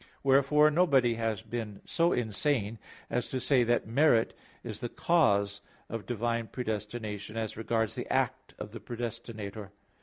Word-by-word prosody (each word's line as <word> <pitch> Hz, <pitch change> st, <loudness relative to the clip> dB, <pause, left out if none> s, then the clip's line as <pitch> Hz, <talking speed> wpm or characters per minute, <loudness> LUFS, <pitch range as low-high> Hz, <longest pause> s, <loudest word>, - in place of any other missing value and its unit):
Wherefore 140 Hz, +3 st, +5 dB
nobody 140 Hz, -8 st, +4 dB
has 110 Hz, -2 st, -2 dB
been 110 Hz, -3 st, -5 dB
so 170 Hz, +1 st, +2 dB
insane 115 Hz, -1 st, 0 dB, 0.3 s
as 120 Hz, -, 0 dB
to 130 Hz, -, -2 dB
say 130 Hz, -1 st, +3 dB
that 120 Hz, 0 st, +2 dB
merit 120 Hz, -1 st, +3 dB, 0.3 s
is -, -, -5 dB
the 120 Hz, -, -3 dB
cause 100 Hz, -14 st, +2 dB, 0.3 s
of 115 Hz, -1 st, -5 dB
divine 115 Hz, -1 st, -1 dB
predestination 110 Hz, -2 st, -4 dB
as 110 Hz, -2 st, -2 dB
regards 115 Hz, -1 st, 0 dB
the -, -, -5 dB
act -, -, -1 dB
of -, -, -7 dB
the 115 Hz, -, -7 dB
predestinator. 110 Hz, -3 st, -6 dB
115 Hz, 145 wpm, -30 LUFS, 110-130 Hz, 0.3 s, Wherefore